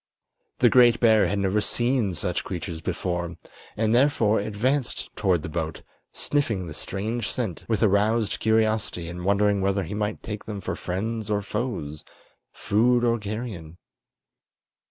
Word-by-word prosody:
The 120 Hz, -, +5 dB
great 120 Hz, 0 st, +6 dB
bear 110 Hz, -3 st, +5 dB
had 100 Hz, -, -1 dB
never 100 Hz, +2 st, +1 dB
seen 120 Hz, -4 st, 0 dB
such 90 Hz, +2 st, -2 dB
creatures 85 Hz, -2 st, -5 dB
before, 90 Hz, 0 st, -3 dB, 0.4 s
and 110 Hz, 0 st, +2 dB
therefore 120 Hz, -4 st, +3 dB
advanced 120 Hz, +6 st, -1 dB
toward 90 Hz, -6 st, +1 dB
the -, -, -4 dB
boat, 80 Hz, 0 st, -4 dB, 0.3 s
sniffing 115 Hz, -10 st, -1 dB
the 80 Hz, -, -7 dB
strange 105 Hz, +7 st, -3 dB
scent 110 Hz, -10 st, -3 dB
with 110 Hz, -3 st, +1 dB
aroused 105 Hz, +2 st, +2 dB
curiosity 110 Hz, -6 st, +1 dB
and 90 Hz, +1 st, -7 dB
wondering 100 Hz, +1 st, +2 dB
whether 100 Hz, 0 st, +1 dB
he 95 Hz, -, -6 dB
might 105 Hz, 0 st, -2 dB
take 105 Hz, -1 st, -6 dB
them 105 Hz, -2 st, -5 dB
for 95 Hz, -, -4 dB
friends 110 Hz, +4 st, -3 dB
or 105 Hz, -1 st, 0 dB
foes, 100 Hz, -, -4 dB, 0.5 s
food 120 Hz, +4 st, +2 dB
or 120 Hz, -1 st, +2 dB
carrion. 105 Hz, -6 st, -6 dB
105 Hz, 145 wpm, -25 LUFS, 95-115 Hz, 0.5 s, great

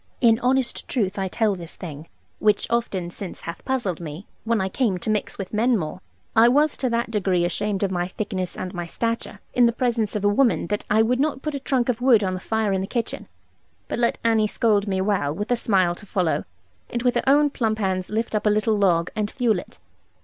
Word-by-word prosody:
In 230 Hz, -2 st, +4 dB
honest 255 Hz, 0 st, 0 dB
truth 200 Hz, -6 st, -1 dB
I 190 Hz, -, 0 dB
tell 215 Hz, +2 st, +1 dB
this 170 Hz, -3 st, -7 dB
thing, 155 Hz, -3 st, -8 dB, 0.3 s
(which 210 Hz, -1 st, +3 dB
often 195 Hz, -7 st, -1 dB
since 190 Hz, 0 st, -7 dB
hath 170 Hz, -, -7 dB
puzzled 240 Hz, -, -1 dB
me, 160 Hz, +4 st, -7 dB, 0.2 s
when 230 Hz, -1 st, +1 dB
I 190 Hz, -, 0 dB
came 200 Hz, -1 st, 0 dB
to 195 Hz, +5 st, -2 dB
mix 210 Hz, -2 st, -2 dB
with 195 Hz, 0 st, -6 dB
men 230 Hz, +3 st, +3 dB
more), 160 Hz, +1 st, -5 dB, 0.3 s
I 230 Hz, +1 st, +7 dB
was 295 Hz, +4 st, +3 dB
to 255 Hz, -, 0 dB
that 235 Hz, 0 st, -1 dB
degree 190 Hz, -5 st, +1 dB
ashamed 200 Hz, +3 st, -1 dB
of 195 Hz, -, 0 dB
my 175 Hz, -1 st, -1 dB
thickness 185 Hz, -2 st, -4 dB
and 185 Hz, 0 st, -5 dB
my 175 Hz, -1 st, -4 dB
stature, 230 Hz, +1 st, -3 dB
in 245 Hz, -1 st, +5 dB
the -, -, +3 dB
presence 230 Hz, -3 st, -1 dB
of 205 Hz, -1 st, -1 dB
a -, -, +6 dB
woman, 230 Hz, +4 st, +3 dB
that 210 Hz, 0 st, -2 dB
I 220 Hz, +1 st, +4 dB
would 250 Hz, +3 st, +1 dB
not 280 Hz, -2 st, 0 dB
put 305 Hz, -, -2 dB
a 280 Hz, -, -3 dB
trunk 260 Hz, -3 st, 0 dB
of 245 Hz, -1 st, -1 dB
wood 245 Hz, -5 st, +5 dB
on 185 Hz, -1 st, 0 dB
the 185 Hz, -, -3 dB
fire 220 Hz, 0 st, 0 dB
in 190 Hz, -, 0 dB
the 190 Hz, -, -3 dB
kitchen, 235 Hz, 0 st, -3 dB, 0.6 s
but -, -, -3 dB
let 235 Hz, -1 st, +2 dB
Annie 225 Hz, -2 st, +3 dB
scold 210 Hz, -1 st, +1 dB
me 190 Hz, -1 st, 0 dB
well, 185 Hz, -8 st, 0 dB
with 205 Hz, +6 st, -4 dB
a -, -, +5 dB
smile 190 Hz, -7 st, +2 dB
to 200 Hz, +4 st, -13 dB
follow, 180 Hz, -4 st, 0 dB, 0.4 s
and 240 Hz, 0 st, -3 dB
with 245 Hz, -1 st, +3 dB
her -, -, 0 dB
own 290 Hz, +1 st, +5 dB
plump 220 Hz, -5 st, 0 dB
hands 190 Hz, -3 st, -1 dB
lift 225 Hz, +2 st, -2 dB
up 215 Hz, 0 st, +1 dB
a -, -, +6 dB
little 215 Hz, +1 st, +2 dB
log, 175 Hz, -5 st, +2 dB
and 210 Hz, -1 st, -1 dB
fuel 230 Hz, -7 st, +1 dB
it. -, -, -12 dB
210 Hz, 235 wpm, -23 LUFS, 190-235 Hz, 0.6 s, I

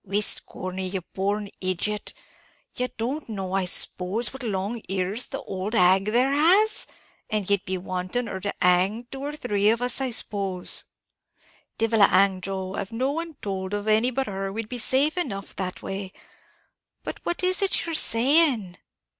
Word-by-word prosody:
"Whist, 205 Hz, +1 st, +2 dB
Corney, 185 Hz, 0 st, -5 dB
ye 190 Hz, +1 st, -3 dB
born 200 Hz, +2 st, -2 dB
idiot, 185 Hz, +3 st, -2 dB, 0.6 s
ye 250 Hz, -, -1 dB
don't 255 Hz, +5 st, -3 dB
know 190 Hz, -3 st, -4 dB
I 195 Hz, -1 st, +1 dB
s'pose 190 Hz, +6 st, +1 dB
what 265 Hz, -, -9 dB
long 215 Hz, 0 st, -3 dB
ears 190 Hz, +5 st, 0 dB
the -, -, -6 dB
old 195 Hz, +4 st, -4 dB
hag 190 Hz, 0 st, +4 dB
there 245 Hz, +5 st, +2 dB
has? 380 Hz, +9 st, +5 dB, 0.4 s
and 210 Hz, -3 st, -1 dB
ye'd 200 Hz, -1 st, +2 dB
be 185 Hz, 0 st, -2 dB
wanting 185 Hz, +6 st, -3 dB
her 190 Hz, -4 st, -5 dB
to 200 Hz, +1 st, -3 dB
hang 185 Hz, +6 st, +2 dB
two 270 Hz, -, -7 dB
or 295 Hz, +1 st, -4 dB
three 210 Hz, -7 st, +1 dB
of 225 Hz, +1 st, +2 dB
us, 245 Hz, +2 st, +2 dB
I 265 Hz, -, 0 dB
s'pose?" 195 Hz, -5 st, +1 dB, 0.9 s
"Divil 225 Hz, -1 st, +1 dB
a 200 Hz, -, +9 dB
hang, 190 Hz, 0 st, +3 dB
Joe; 190 Hz, 0 st, -4 dB
av 195 Hz, -, -4 dB
no 255 Hz, +4 st, -1 dB
one 330 Hz, +1 st, -5 dB
towld 190 Hz, 0 st, -3 dB
of 205 Hz, +1 st, -5 dB
any 220 Hz, +3 st, +3 dB
but 265 Hz, +1 st, -2 dB
her, 195 Hz, -2 st, -4 dB
we'd 220 Hz, +1 st, -5 dB
be 245 Hz, -, -4 dB
safe 285 Hz, +8 st, +2 dB
enough 200 Hz, -, -4 dB
that 185 Hz, -1 st, -4 dB
way; 195 Hz, 0 st, -5 dB, 0.9 s
but -, -, -6 dB
what 345 Hz, -, -2 dB
is 370 Hz, +3 st, +3 dB
it 390 Hz, -3 st, +1 dB
ye're 335 Hz, -, -4 dB
saying?" 250 Hz, -, +4 dB
210 Hz, 175 wpm, -25 LUFS, 190-250 Hz, 0.9 s, a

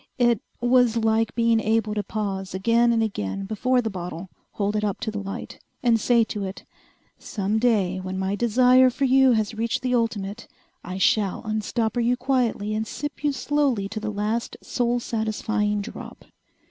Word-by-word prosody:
It 240 Hz, -3 st, +3 dB, 0.2 s
was 245 Hz, -1 st, +4 dB
like 225 Hz, 0 st, +1 dB
being 230 Hz, -1 st, +3 dB
able 220 Hz, 0 st, +1 dB
to 210 Hz, -, -1 dB
pause 195 Hz, -2 st, -4 dB
again 230 Hz, +5 st, +3 dB
and 225 Hz, -1 st, +2 dB
again 195 Hz, -, -3 dB
before 245 Hz, +5 st, +1 dB
the 225 Hz, -, -1 dB
bottle, 180 Hz, -1 st, -6 dB, 0.2 s
hold 205 Hz, 0 st, -1 dB
it 210 Hz, -, 0 dB
up 205 Hz, -2 st, -1 dB
to 220 Hz, -, -2 dB
the 210 Hz, -, -4 dB
light, 195 Hz, 0 st, -7 dB, 0.2 s
and 235 Hz, -2 st, +4 dB
say 235 Hz, +1 st, +4 dB
to 210 Hz, -2 st, -4 dB
it, 190 Hz, 0 st, -7 dB, 0.5 s
"Some 205 Hz, +1 st, -2 dB
day, 205 Hz, -6 st, +2 dB
when 185 Hz, 0 st, -5 dB
my 190 Hz, +1 st, -1 dB
desire 250 Hz, +3 st, +5 dB
for 270 Hz, +2 st, -1 dB
you 265 Hz, 0 st, +5 dB
has 220 Hz, -1 st, 0 dB
reached 230 Hz, +3 st, -2 dB
the 255 Hz, 0 st, 0 dB
ultimate, 225 Hz, -2 st, -2 dB, 0.4 s
I 185 Hz, -, -5 dB
shall 195 Hz, 0 st, +1 dB
unstopper 220 Hz, +2 st, -1 dB
you 245 Hz, +1 st, +2 dB
quietly 245 Hz, -5 st, 0 dB
and 220 Hz, +1 st, -2 dB
sip 290 Hz, +4 st, -6 dB
you 295 Hz, -, +2 dB
slowly 270 Hz, -5 st, 0 dB
to 215 Hz, +1 st, -4 dB
the 215 Hz, 0 st, -4 dB
last 210 Hz, +3 st, -2 dB
soul 245 Hz, 0 st, 0 dB
satisfying 220 Hz, -2 st, -1 dB
drop." 215 Hz, -, -9 dB
220 Hz, 175 wpm, -24 LUFS, 205-240 Hz, 0.5 s, desire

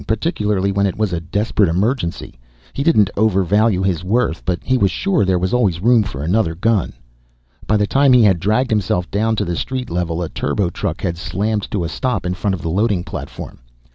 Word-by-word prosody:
Particularly 105 Hz, -, 0 dB
when 100 Hz, 0 st, +1 dB
it 95 Hz, -, -4 dB
was 105 Hz, -4 st, -1 dB
a 85 Hz, -, -1 dB
desperate 100 Hz, +2 st, 0 dB
emergency. 90 Hz, -, -2 dB, 0.3 s
He -, -, -3 dB
didn't 110 Hz, -, +3 dB
overvalue 100 Hz, -1 st, +2 dB
his 90 Hz, -3 st, -1 dB
worth, 105 Hz, -3 st, 0 dB
but 90 Hz, -1 st, 0 dB
he 130 Hz, -, +1 dB
was 100 Hz, -6 st, +3 dB
sure 190 Hz, -, 0 dB
there 95 Hz, -1 st, +2 dB
was 90 Hz, +3 st, -1 dB
always 100 Hz, -9 st, +1 dB
room 120 Hz, +4 st, +4 dB
for 75 Hz, -10 st, -5 dB
another 85 Hz, 0 st, +1 dB
gun. 110 Hz, +1 st, 0 dB, 0.7 s
By 105 Hz, -, +3 dB
the 105 Hz, -, +2 dB
time 135 Hz, +5 st, +3 dB
he 125 Hz, -2 st, +6 dB
had 95 Hz, -5 st, +4 dB
dragged 110 Hz, +7 st, +1 dB
himself 100 Hz, -3 st, 0 dB
down 110 Hz, +2 st, +1 dB
to 105 Hz, -, -1 dB
the 85 Hz, -1 st, -2 dB
street 130 Hz, +5 st, -4 dB
level 85 Hz, 0 st, -2 dB
a 85 Hz, -, -4 dB
turbo 85 Hz, +5 st, -1 dB
truck -, -, -4 dB
had 85 Hz, -2 st, -3 dB
slammed 100 Hz, +3 st, -2 dB
to 100 Hz, -4 st, -2 dB
a -, -, -2 dB
stop 110 Hz, +2 st, -2 dB
in 90 Hz, -, -1 dB
front 95 Hz, +1 st, -1 dB
of 85 Hz, -, -10 dB
the 80 Hz, -, -2 dB
loading 100 Hz, -1 st, +1 dB
platform. -, -, -8 dB
100 Hz, 210 wpm, -18 LUFS, 90-110 Hz, 0.7 s, he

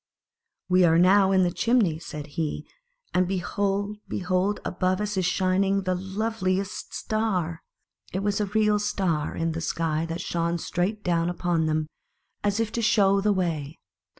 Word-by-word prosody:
"We 185 Hz, 0 st, +4 dB
are 165 Hz, -1 st, +5 dB
now 190 Hz, +2 st, +5 dB
in 190 Hz, -1 st, +4 dB
the 175 Hz, -, +1 dB
chimney," 215 Hz, -8 st, +2 dB
said 150 Hz, -3 st, -7 dB
he; 150 Hz, +1 st, -4 dB, 0.5 s
"and 180 Hz, 0 st, +2 dB
behold, 200 Hz, +2 st, -1 dB
behold, 185 Hz, +2 st, 0 dB
above 185 Hz, +1 st, 0 dB
us 210 Hz, 0 st, -2 dB
is 185 Hz, -2 st, +1 dB
shining 190 Hz, +1 st, +1 dB
the 185 Hz, -1 st, 0 dB
loveliest 190 Hz, 0 st, -2 dB
star 185 Hz, -7 st, -1 dB, 0.3 s
!" -, -, -31 dB
It 190 Hz, +2 st, -2 dB
was 205 Hz, 0 st, 0 dB
a 205 Hz, -, 0 dB
real 210 Hz, +1 st, +2 dB
star 185 Hz, -7 st, -1 dB
in 165 Hz, 0 st, -1 dB
the 165 Hz, +1 st, -4 dB
sky 165 Hz, -1 st, -1 dB
that 165 Hz, +1 st, -4 dB
shone 170 Hz, 0 st, -1 dB
straight 190 Hz, +5 st, -2 dB
down 170 Hz, -1 st, +1 dB
upon 175 Hz, -2 st, 0 dB
them, 155 Hz, 0 st, 0 dB, 0.6 s
as 205 Hz, +1 st, +1 dB
if 225 Hz, -2 st, 0 dB
to 235 Hz, -, -2 dB
show 200 Hz, -2 st, +4 dB
the 210 Hz, +1 st, +2 dB
way. 165 Hz, -6 st, -2 dB
185 Hz, 165 wpm, -26 LUFS, 170-205 Hz, 0.6 s, are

